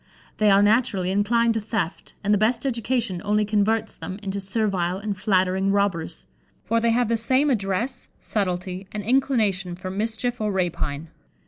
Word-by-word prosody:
They 215 -1 +4
are, 200 0 +6
naturally, 205 -4 +2
inclined 230 +4 +2
to 225 - 0
theft, 210 -5 -3
and 205 0 +2
the - - +4
best 230 +6 +1
education 235 -6 -1
only 210 +1 +2
converts 215 +1 +1
them 185 - -6
into 195 0 -3
servile 190 -3 0
and 205 0 -3
flattering 190 -1 +1
robbers; 200 -5 -1 0.4
for 230 - +2
they 230 - +2
have 240 +1 +2
the 230 +1 +1
same 260 +6 +2
address, 225 +3 -1
subtlety, 185 -2 -3
and 210 -1 -4
inclination 215 -7 +1
for 185 +1 -6
mischief 225 +4 -2
or 210 -1 0
rapine. 165 -5 -2
205 Hz, 160 wpm, -24 LUFS, 190-230 Hz, 0.4 s, are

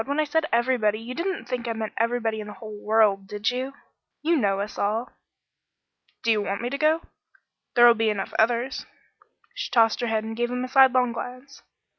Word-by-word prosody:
When 285 +5 -2
I - - +4
said 305 +1 0
everybody, 235 -3 +2
you 235 +3 -7
didn't 350 +5 -3
think 245 -1 -4
I 230 - -1
meant 220 -1 -4
everybody 230 -1 0
in 210 - -6
the 210 - -8
whole 215 -2 -10
world, 210 -3 +3
did 210 +3 -1
you? 260 +2 -4 0.5
You 335 +2 +3
know 200 -8 +1
us 205 +1 -5
all." 220 +4 -1 1.1
"Do 230 - +3
you 215 -1 +2
want 200 0 -2
me 245 - -2
to 280 - -2
go? 315 +2 +2 0.7
There'll 240 0 +8
be 225 -1 +1
enough 205 -2 -3
others 240 +3 +1 0.3
" - - -35
She - - -4
tossed 225 0 +3
her 240 - 0
head 220 -1 0
and 225 0 -5
gave 240 +1 -1
him 250 0 -2
a - - -3
sidelong 255 -2 +4
glance. 250 +4 -8
235 Hz, 205 wpm, -25 LUFS, 215-255 Hz, 1.1 s, There'll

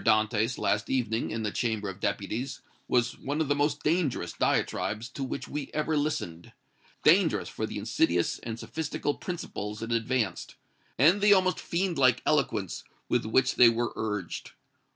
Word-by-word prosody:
DANTÈS, 110 +2 +2
last 105 0 0
evening, 115 -3 0
in 110 +1 -3
the 105 - -1
Chamber 110 -3 -1
of 95 0 -6
Deputies, 120 +8 -3 0.3
was 125 0 +1
one 145 +3 -3
of 155 -3 0
the 145 - +3
most 145 0 0
dangerous 150 - 0
diatribes 110 +3 0
to 135 +1 -5
which 135 - -4
we 145 -1 -4
ever 155 +1 0
listened 90 - -2 0.5
dangerous - - +4
for - - -4
the - - -6
insidious 85 0 +1
and 115 -1 -5
sophistical 145 +2 -3
principles 105 - -5
it 115 - -4
advanced, 115 -4 -1 0.4
and 170 - +5
the 205 0 +7
almost 185 -1 +2
fiend 175 -2 -1
like 130 -3 +4
eloquence 120 - 0 0.3
with - - +1
which 130 +4 +2
they 120 - +9
were 115 +1 -1
urged. 105 -5 -4
120 Hz, 160 wpm, -28 LUFS, 110-145 Hz, 0.5 s, they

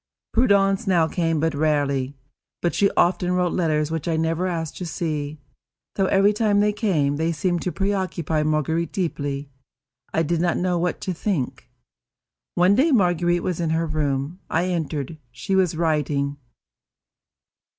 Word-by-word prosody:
Prudence 200 -3 +3
now 170 -4 +3
came 165 -1 0
but 160 +1 +1
rarely; 145 -3 0 0.4
but 175 - 0
she 200 - +3
often 180 0 +2
wrote 180 -1 +1
letters 155 -3 0
which 160 -1 -3
I 165 - +1
never 165 +3 0
asked 165 -3 -3
to 180 - -5
see, 150 -2 -3 0.6
though, 195 -1 +1
every 200 +2 +4
time 210 -1 +2
they 210 0 +3
came, 160 -10 +1
they 160 +2 0
seemed 175 +1 -1
to 180 - -2
preoccupy 185 -6 -1
Marguerite 155 +2 0
deeply. 145 -6 -3 0.6
I 160 - +1
did 165 +1 0
not 175 -1 +1
know 180 -1 0
what 175 0 -1
to 185 - -2
think. 170 - -3 0.9
One 180 +3 +4
day 275 +9 +3
Marguerite 175 - +2
was 180 -2 -2
in 165 -2 0
her 165 +1 +1
room. 150 +1 -2
I 175 +3 0
entered. 155 -3 -3
She 125 +10 -2
was 180 -4 +2
writing. 145 -3 0
165 Hz, 155 wpm, -23 LUFS, 155-185 Hz, 0.9 s, every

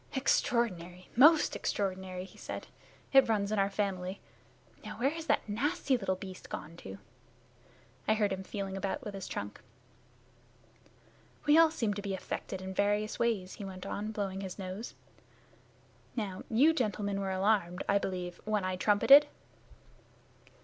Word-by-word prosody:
"Extraordinary! 185 -9 0
Most 300 +5 +6
extraordinary!" 185 -2 -2
he - - -16
said. - - -6 0.5
"It 270 -3 +7
runs 205 -2 +1
in 215 - +1
our 195 0 +3
family. 195 -2 -2 0.6
Now, - - -7
where 270 +4 +2
has 325 0 -6
that - - +1
nasty 270 +6 0
little 195 -5 -1
beast 185 -1 -9
gone 160 +2 -6
to?" 95 - -9 1.1
I 215 - +4
heard 205 -3 +1
him 190 - -4
feeling 195 0 -5
about 195 +8 -3
with 210 -4 -6
his 195 -1 -6
trunk. - - -5 1.8
"We 295 0 +6
all 325 0 +7
seem 230 -9 -1
to 205 - -5
be 200 -1 -3
affected 190 0 -5
in 190 0 -5
various 205 +2 0
ways," 210 -6 0
he - - -8
went 185 -1 -7
on, 210 +2 -3
blowing 195 -3 -3
his 190 -2 -6
nose. 195 +3 -6 1.2
"Now, 200 -6 -3
you 275 +8 +5
gentlemen 205 - -1
were 195 - -2
alarmed, 190 -2 +1
I 200 - +4
believe, 180 -2 -4
when 210 -2 0
I 185 0 -1
trumpeted." 270 +10 +7
200 Hz, 150 wpm, -31 LUFS, 190-225 Hz, 1.8 s, It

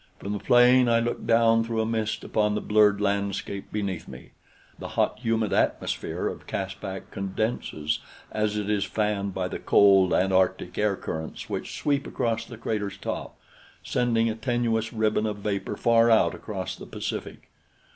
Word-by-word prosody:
From 100 - -5
the 105 - -3
plane 125 +2 +5
I 115 0 +4
looked 120 +1 -3
down 115 0 +4
through 115 0 -2
a 110 - +1
mist 110 -1 -2
upon 105 -1 +1
the - - 0
blurred 105 -1 +3
landscape 100 -1 -2
beneath 100 -4 -3
me. - - -11 0.5
The - - -6
hot, - - +1
humid 115 -2 0
atmosphere - - -1
of - - -6
Caspak 95 0 -5
condenses 95 -6 -2 0.3
as 105 -1 0
it 105 -1 -2
is 105 -2 +1
fanned 100 -1 -1
by 90 -1 -1
the - - -5
cold 95 -2 +5
Antarctic 95 -1 +1
air 105 -1 +1
currents 80 -3 -6
which - - -4
sweep 140 -1 0
across 115 -1 -1
the 115 - -10
crater's 105 -3 -3
top, - - -5 0.5
sending 115 -2 +1
a 110 - 0
tenuous 115 -1 -1
ribbon 110 -1 +1
of 105 -1 -3
vapor 100 0 -3
far 115 0 +4
out 110 - +4
across - - -5
the - - -11
Pacific. - - -6
105 Hz, 165 wpm, -26 LUFS, 100-115 Hz, 0.5 s, plane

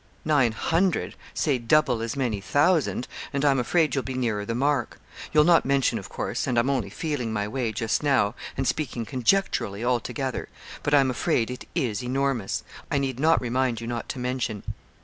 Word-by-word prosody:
'Nine 140 -7 +3
hundred 170 - 0 0.2
say 140 -5 +1
double 125 0 +3
as 115 -1 -3
many 120 -7 -1
thousand, 145 - +2 0.2
and 140 +1 0
I'm 135 -2 +4
afraid 155 +3 +2
you'll 135 - 0
be 130 - -5
nearer 115 -5 -1
the 115 - -2
mark. 135 -1 0 0.3
You'll 150 -1 +6
not 170 +1 +5
mention, 135 -1 +2
of - - -10
course, - - -3
and 125 -2 0
I'm 125 +4 +3
only 130 -6 -1
feeling 145 -8 -3
my 105 -1 -1
way 120 0 -2
just 110 +1 -1
now, 135 -8 +2 0.2
and 135 -1 0
speaking 125 -6 -2
conjecturally 125 - 0
altogether; 125 +2 -1 0.3
but 145 - +2
I'm 135 -2 +4
afraid 120 -1 0
it 125 - -8
is 125 - -1
enormous. 130 -4 -1 0.3
I - - +1
need 135 -2 -1
not 160 +3 +4
remind 125 -1 0
you 115 - -6
not 120 0 -4
to - - -4
mention.' 125 -4 -2
130 Hz, 185 wpm, -26 LUFS, 115-145 Hz, 0.3 s, You'll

